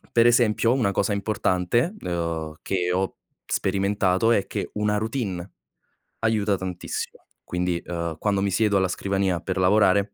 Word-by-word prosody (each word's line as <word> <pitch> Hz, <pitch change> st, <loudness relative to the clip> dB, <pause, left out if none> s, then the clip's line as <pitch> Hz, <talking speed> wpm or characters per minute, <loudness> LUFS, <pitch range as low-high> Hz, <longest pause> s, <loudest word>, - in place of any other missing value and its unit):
per 115 Hz, 0 st, +6 dB
esempio 120 Hz, -1 st, +4 dB
una 125 Hz, -6 st, +2 dB
cosa 100 Hz, +1 st, 0 dB
importante, 100 Hz, -, 0 dB
uhm, 85 Hz, -3 st, -3 dB
che 90 Hz, -2 st, -1 dB
ho 95 Hz, +1 st, -1 dB, 0.3 s
sperimentato 100 Hz, +2 st, +1 dB
è 100 Hz, -3 st, +2 dB
che -, -, -4 dB
una 105 Hz, 0 st, +1 dB
routine, 105 Hz, -5 st, -3 dB, 0.7 s
aiuta 105 Hz, -3 st, +1 dB
tantissimo. 90 Hz, -2 st, -5 dB, 0.2 s
Quindi, 90 Hz, -1 st, -1 dB
uhm, 85 Hz, -2 st, -3 dB
quando 100 Hz, +2 st, 0 dB
mi 100 Hz, -, +1 dB
siedo 105 Hz, +1 st, +2 dB
alla 95 Hz, -1 st, +2 dB
scrivania 95 Hz, -1 st, 0 dB
per 95 Hz, +2 st, -3 dB
lavorare, 100 Hz, +1 st, +3 dB
100 Hz, 140 wpm, -24 LUFS, 90-105 Hz, 0.7 s, per